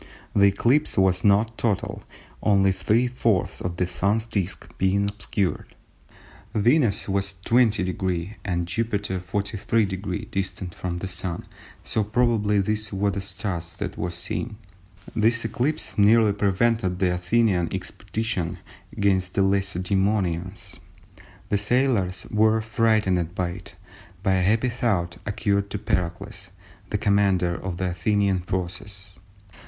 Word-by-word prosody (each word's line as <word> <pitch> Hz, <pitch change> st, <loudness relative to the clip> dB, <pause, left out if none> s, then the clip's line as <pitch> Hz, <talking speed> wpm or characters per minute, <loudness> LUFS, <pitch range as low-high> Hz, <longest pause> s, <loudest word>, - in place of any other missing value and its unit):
The 100 Hz, 0 st, +6 dB
eclipse 120 Hz, +9 st, +2 dB
was 95 Hz, -1 st, +3 dB
not 105 Hz, +2 st, +3 dB
total 105 Hz, -5 st, -1 dB, 0.4 s
only 100 Hz, -2 st, +4 dB
three 105 Hz, +6 st, +2 dB
fourths 115 Hz, -6 st, 0 dB
of 90 Hz, -1 st, -3 dB
the 90 Hz, -, +1 dB
Sun's 100 Hz, +5 st, 0 dB
disc 95 Hz, -5 st, -4 dB
being 95 Hz, +1 st, +2 dB
obscured. 100 Hz, -2 st, -2 dB, 0.8 s
Venus 115 Hz, 0 st, +3 dB
was 100 Hz, 0 st, 0 dB
20° 95 Hz, -5 st, +1 dB
and 85 Hz, -3 st, -1 dB
Jupiter 100 Hz, 0 st, -1 dB
43° 100 Hz, 0 st, -1 dB
distant 95 Hz, -2 st, -3 dB
from 90 Hz, -1 st, -4 dB
the 95 Hz, -, -4 dB
Sun, 90 Hz, -1 st, -4 dB, 0.4 s
so 110 Hz, -, +1 dB
probably 105 Hz, -2 st, +2 dB
these 105 Hz, +1 st, -1 dB
were 100 Hz, +1 st, +1 dB
the 100 Hz, 0 st, -3 dB
"stars" 95 Hz, -4 st, -4 dB
that -, -, -4 dB
were 90 Hz, -, -2 dB
seen. 100 Hz, +6 st, -4 dB, 0.6 s
This 115 Hz, +1 st, +2 dB
eclipse 130 Hz, +7 st, -1 dB
nearly 105 Hz, +1 st, +5 dB
prevented 100 Hz, -1 st, +1 dB
the 90 Hz, -1 st, +2 dB
Athenian 90 Hz, 0 st, +1 dB
expedition 110 Hz, -7 st, -3 dB, 0.4 s
against 95 Hz, -3 st, +1 dB
the 100 Hz, -, +3 dB
Lacedæmonians. 95 Hz, -1 st, 0 dB, 0.7 s
The 100 Hz, -, +2 dB
sailors 105 Hz, -4 st, +1 dB
were 110 Hz, +1 st, +4 dB
frightened 105 Hz, -6 st, +1 dB
by 90 Hz, -2 st, 0 dB
it, 90 Hz, 0 st, -9 dB, 0.5 s
but 95 Hz, -, +2 dB
a -, -, +2 dB
happy 110 Hz, +7 st, +2 dB
thought 100 Hz, -8 st, -1 dB
occurred 100 Hz, -1 st, 0 dB
to -, -, -3 dB
Pericles, 95 Hz, +1 st, -3 dB, 0.4 s
the 105 Hz, -, 0 dB
commander 100 Hz, -4 st, +2 dB
of 90 Hz, 0 st, -5 dB
the 90 Hz, 0 st, -1 dB
Athenian 100 Hz, +2 st, +1 dB
forces. 95 Hz, +2 st, -4 dB
100 Hz, 125 wpm, -25 LUFS, 90-110 Hz, 0.8 s, The